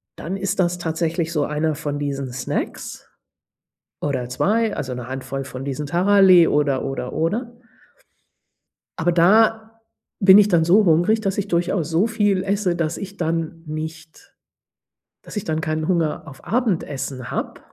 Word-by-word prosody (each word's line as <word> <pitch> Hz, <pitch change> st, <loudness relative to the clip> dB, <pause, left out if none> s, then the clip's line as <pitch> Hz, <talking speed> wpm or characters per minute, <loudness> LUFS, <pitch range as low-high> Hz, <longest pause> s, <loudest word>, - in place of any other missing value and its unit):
dann 185 Hz, +5 st, -5 dB
ist 195 Hz, 0 st, -3 dB
das 175 Hz, -1 st, +1 dB
tatsächlich 165 Hz, 0 st, -2 dB
so 150 Hz, -3 st, 0 dB
einer 150 Hz, +1 st, -1 dB
von 145 Hz, -1 st, -4 dB
diesen 140 Hz, -3 st, -3 dB
Snacks, 125 Hz, 0 st, -5 dB, 0.9 s
oder 130 Hz, -4 st, -2 dB
2, 215 Hz, -, +1 dB
also, 130 Hz, -3 st, -4 dB
'ne 125 Hz, -1 st, -7 dB
Handvoll 135 Hz, +1 st, -5 dB
von 130 Hz, -1 st, -7 dB
diesen 140 Hz, +1 st, -4 dB
Taralli 185 Hz, +1 st, +5 dB
oder, 145 Hz, -3 st, +1 dB
oder, 130 Hz, -2 st, -4 dB
oder. 215 Hz, +10 st, -1 dB, 1.5 s
Aber 175 Hz, +2 st, +1 dB
da 220 Hz, +5 st, +3 dB, 0.4 s
bin 190 Hz, -1 st, +8 dB
ich 210 Hz, -, +5 dB
dann 165 Hz, -3 st, +3 dB
so 195 Hz, +6 st, +5 dB
hungrig, 175 Hz, +7 st, +3 dB
dass 195 Hz, -2 st, -2 dB
ich 200 Hz, 0 st, -2 dB
durchaus 175 Hz, -2 st, 0 dB
so 170 Hz, +7 st, +2 dB
viel 205 Hz, -4 st, +1 dB
esse, 195 Hz, -2 st, 0 dB
dass 165 Hz, -1 st, -2 dB
ich 200 Hz, 0 st, -7 dB
dann 165 Hz, -2 st, -3 dB
nicht 160 Hz, +1 st, -8 dB, 0.9 s
dass -, -, -9 dB
ich 205 Hz, -, -2 dB
dann 160 Hz, -1 st, -2 dB
keinen 155 Hz, -1 st, -2 dB
Hunger 165 Hz, -3 st, -1 dB
auf 135 Hz, -3 st, -12 dB
Abendessen 150 Hz, -, -2 dB
habe -, -, -4 dB
165 Hz, 150 wpm, -21 LUFS, 150-195 Hz, 1.5 s, bin